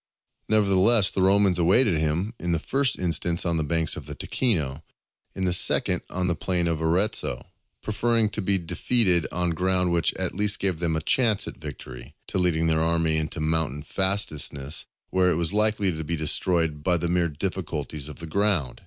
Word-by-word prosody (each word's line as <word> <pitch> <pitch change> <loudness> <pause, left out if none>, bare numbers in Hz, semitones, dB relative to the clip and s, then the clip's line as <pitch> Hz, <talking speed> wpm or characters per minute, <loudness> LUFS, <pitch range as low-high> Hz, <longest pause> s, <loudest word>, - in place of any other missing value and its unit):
Nevertheless 105 0 +3
the 95 - -1
Romans 95 -1 +3
awaited 95 +1 +3
him, 80 +8 -1
in 85 0 -2
the - - +2
first 135 - 0
instance 85 -1 -1
on 85 -1 0
the 80 - 0
banks 80 +1 0
of - - -9
the - - -7
Ticino, 80 - -2 0.5
in 95 - -2
the 90 - +1
second - - +4
on 90 0 -2
the 90 - +1
plain 90 0 -1
of 80 -1 -2
Arezzo, 80 - 0 0.4
preferring 115 +1 +1
to 110 - -3
be 100 0 +1
defeated 90 0 +1
on 90 0 0
ground 90 +1 +1
which 85 -1 +1
at 95 -1 -3
least 105 +1 0
gave 95 -5 -1
them 85 -2 -1
a 80 - -2
chance 115 +1 +1
of - - -8
victory, 65 +5 -10
to - - -3
leading 85 -3 +1
their 80 -1 +2
army 80 -1 +1
into 80 +2 -3
mountain 75 -3 -1
fastnesses 80 -7 -1 0.2
where 95 -1 +3
it 90 - +1
was 85 +2 +1
likely 105 -4 +2
to 80 - -5
be 85 +3 -3
destroyed 80 0 +1
by 90 +1 +2
the 85 +1 -2
mere 85 -1 +1
difficulties 75 -3 -5
of 75 - -9
the 85 - -9
ground. 90 -6 -1
85 Hz, 190 wpm, -25 LUFS, 80-95 Hz, 0.5 s, second